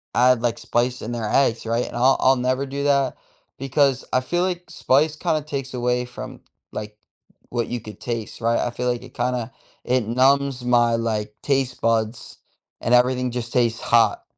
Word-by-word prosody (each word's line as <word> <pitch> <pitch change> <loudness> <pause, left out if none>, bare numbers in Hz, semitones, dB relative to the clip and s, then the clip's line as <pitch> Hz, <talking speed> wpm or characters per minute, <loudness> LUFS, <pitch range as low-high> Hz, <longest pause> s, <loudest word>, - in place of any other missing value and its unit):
add 125 -1 +4
like, 120 -1 0
spice 120 +1 -1
in 115 - -5
their 115 -2 -3
eggs, 120 -5 +2
right, 115 +2 0
and - - -9
I'll 130 +2 +4
I'll 130 +1 +5
never 130 +2 0
do 140 +1 -4
that 140 -2 +2 0.4
because 135 0 +1
I 130 - +4
feel 175 +7 -1
like 180 -1 -2
spice 150 -2 +2
kinda 155 -1 0
takes 140 -3 -5
away 125 0 0
from, 125 - -9 0.3
like, 105 0 -6 0.5
what 120 -2 -2
you 120 - -3
could 105 -3 -11
taste, 115 -3 -5
right, 115 +1 +2
I 120 - 0
feel 125 +1 -3
like 120 - -3
it - - -13
kinda 125 -1 -1 0.3
it 125 -3 0
numbs 130 +1 +2
my, 120 -1 +3
like, 110 -2 -2
taste 135 -3 0
buds 115 0 -1 0.4
and 120 - 0
everything 125 0 +3
just 120 -1 -4
tastes 115 -3 +1
hot. 115 -3 +3
125 Hz, 185 wpm, -22 LUFS, 115-135 Hz, 0.5 s, I'll